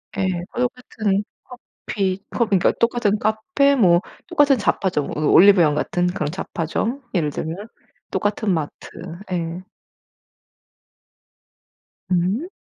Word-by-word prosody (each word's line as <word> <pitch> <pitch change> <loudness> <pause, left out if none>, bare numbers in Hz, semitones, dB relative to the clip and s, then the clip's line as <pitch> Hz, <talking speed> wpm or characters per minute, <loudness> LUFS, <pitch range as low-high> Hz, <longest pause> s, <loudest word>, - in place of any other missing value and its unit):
예. 195 -1 0 0.3
다 - - -5
똑같은 225 -5 -1 0.6
커피, 190 -2 -1
컵 235 - +1
그러니까 195 -3 +3
똑같은 230 -3 +1
카페 280 +7 +2
뭐 180 -9 +5 0.3
똑같은 290 -6 +4
잡화점 190 -8 0
으 - - -2
올리브영 175 -4 +6
같은 175 +3 0
그런 165 -5 -2
잡화점, 190 - -3
예를 165 -6 +1
들면. 170 +9 -5 0.4
똑같은 205 -1 0
마트. 155 -4 -4 0.5
예. 170 0 -3 2.5
음. 185 - +1
195 Hz, 225 characters per minute, -21 LUFS, 175-235 Hz, 2.5 s, 올리브영